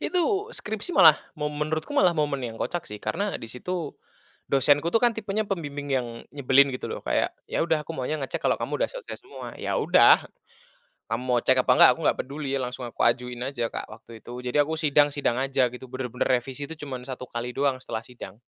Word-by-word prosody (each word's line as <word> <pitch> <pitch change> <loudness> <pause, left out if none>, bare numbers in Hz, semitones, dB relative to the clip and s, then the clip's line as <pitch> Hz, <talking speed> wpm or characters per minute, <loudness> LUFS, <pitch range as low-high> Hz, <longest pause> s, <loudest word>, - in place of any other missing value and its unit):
Itu 390 +5 0
skripsi 220 - -4
malah 155 -2 +8 0.2
mo 150 - -1
menurutku 155 - -3
malah 180 -10 +4
momen 145 -3 0
yang 115 -2 -5
kocak 175 -1 -3
sih 105 0 -7
karena 200 - -2
di - - -8
situ 155 +7 -4 0.6
dosenku 145 +4 +3
tuh 225 - +4
kan 240 -2 +3
tipenya 215 0 -2
pembimbing 145 -6 -4
yang 130 -3 0 0.3
nyebelin 140 0 +5
gitu - - -6
loh - - -5
kayak, - - 0 0.2
"Ya - - 0
udah 165 -2 +1
aku 165 - -6
maunya 135 +4 -2
ngecek 135 - -4
kalau - - +3
kamu - - -1
udah - - -2
selesai - - -8
semua." 390 - -9
"Ya - - -3
udah, - - +6 0.8
kamu 120 +2 -2
mau 125 -1 +2
cek 130 +2 +3
apa - - +4
enggak - - +8
aku - - -13
nggak - - +3
peduli," 140 +1 -5
langsung 125 0 -4
aku 120 - -6
ajuin 125 0 +1
aja, 125 -2 -2
Kak, - - -5
waktu 115 0 -12
itu. 120 - -10
Jadi 125 +3 -1
aku 150 +2 -1
sidang 145 -2 +4
sidang 140 -4 -1
aja 135 -1 +2
gitu 125 +1 -10
bener-bener 125 -1 -2
revisi 130 +3 -1
tuh 160 - -7
cuman 135 -4 -6
1 130 -1 -6
kali 120 0 -5
doang 140 -1 +1
setelah 110 -3 -5
sidang. 120 -3 -11
140 Hz, 210 wpm, -26 LUFS, 125-160 Hz, 0.8 s, malah